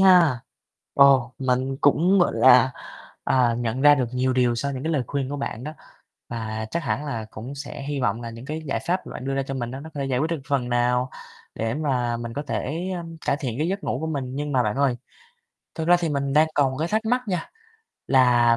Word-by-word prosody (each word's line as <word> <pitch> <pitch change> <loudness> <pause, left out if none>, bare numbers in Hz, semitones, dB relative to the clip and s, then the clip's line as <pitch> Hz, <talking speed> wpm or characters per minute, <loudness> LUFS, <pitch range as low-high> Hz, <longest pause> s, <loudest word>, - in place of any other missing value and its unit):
ha. 175 -10 +6 0.5
Ồ, 135 -3 +5
mình 130 0 0
cũng, 175 +7 +4
gọi 175 - +3
là, 130 0 +6 0.5
à, 125 -3 +3
nhận 120 +1 -2
ra 145 0 +8
được 130 - 0
nhiều 130 +1 +1
điều 125 -2 +2
sau 140 +4 -2
những 130 - -5
cái 160 - -1
lời 145 -5 +1
khuyên 140 0 -2
của 145 - -3
bạn 130 -3 -4
đó. 155 - -5 0.6
Và 110 -2 -4
chắc 170 - -2
hẳn 140 +2 -1
là 115 -6 -4
cũng 125 +6 -8
sẽ 140 -1 -7
hy 140 0 -3
vọng 110 -1 0
là 115 - -5
những 115 +2 -10
cái 155 +3 -5
giải 135 - -1
pháp 185 +2 -1
mà - - -8
bạn 130 - -6
đưa 135 0 -1
ra 135 - 0
cho 135 0 -5
mình 120 -3 -3
á, 130 +2 -6
nó 160 +2 -9
có 145 - -4
thể 135 - -1
giải 130 -2 0
quyết 155 +5 0
được 165 -3 -2
phần 135 -4 0
nào, 125 +1 +1 0.4
để 115 +1 -2
mà 125 -6 0
mình 115 0 -6
có 145 - -3
thể, 160 +5 -3
ơm, 165 -1 -7
cải 140 - +2
thiện 125 -5 -3
cái 155 +3 0
giấc 195 +1 -3
ngủ - - -1
của 160 - -2
mình. 135 -5 -3
Nhưng 145 0 -3
mà 125 - +3
bạn 105 +1 -1
ơi, 135 -3 +2 0.8
thực 160 -1 -2
ra 175 - +7
thì 170 - 0
mình 140 -2 -1
đang 155 +2 +5
còn 140 -3 +2
một 130 - -6
cái 160 +2 -1
thắc 220 +1 0
mắc 250 +2 +2
nha, 180 -4 -2 0.6
là 120 -3 +5
135 Hz, 250 wpm, -24 LUFS, 125-150 Hz, 0.8 s, ra